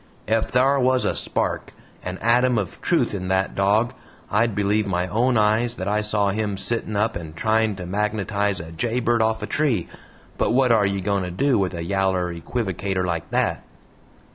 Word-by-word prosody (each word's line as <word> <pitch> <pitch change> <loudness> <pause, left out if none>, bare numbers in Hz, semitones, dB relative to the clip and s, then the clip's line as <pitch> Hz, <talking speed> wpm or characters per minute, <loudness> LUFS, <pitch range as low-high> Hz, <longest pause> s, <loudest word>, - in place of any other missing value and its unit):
"Ef 110 +1 +1
thar 135 +3 +3
was 130 0 +2
a - - +1
spark, - - -2 0.3
an 90 0 -4
ATOM 120 +1 +3
of 100 -5 -4
truth - - +1
in 95 -2 -4
THAT 95 +1 0
DOG, 105 +5 +2 0.4
I'd 110 0 +2
believe 105 +1 +1
my 90 -2 0
own 120 +5 +1
eyes 110 +3 +2
that 95 -2 -5
I 105 +1 +1
saw 105 -1 +1
him 105 0 -2
sittin' 110 0 -1
up 110 +2 +1
and 80 -2 -7
trying 110 +3 +1
to 90 -1 -7
magnetize 105 0 -1
a 80 0 -8
jay 115 +9 -1
bird 120 -1 +1
off 110 0 0
a - - 0
tree. 125 - 0 0.5
But - - +1
wot 130 -1 +3
are 105 -3 +4
ye 100 -1 -2
goin' 100 0 0
to 90 - -3
do 130 +7 +1
with 95 -2 -1
a 85 - -4
yaller 95 -1 0
equivocator 95 0 -2
like 85 -2 -3
that?" - - 0
105 Hz, 190 wpm, -23 LUFS, 95-115 Hz, 0.5 s, are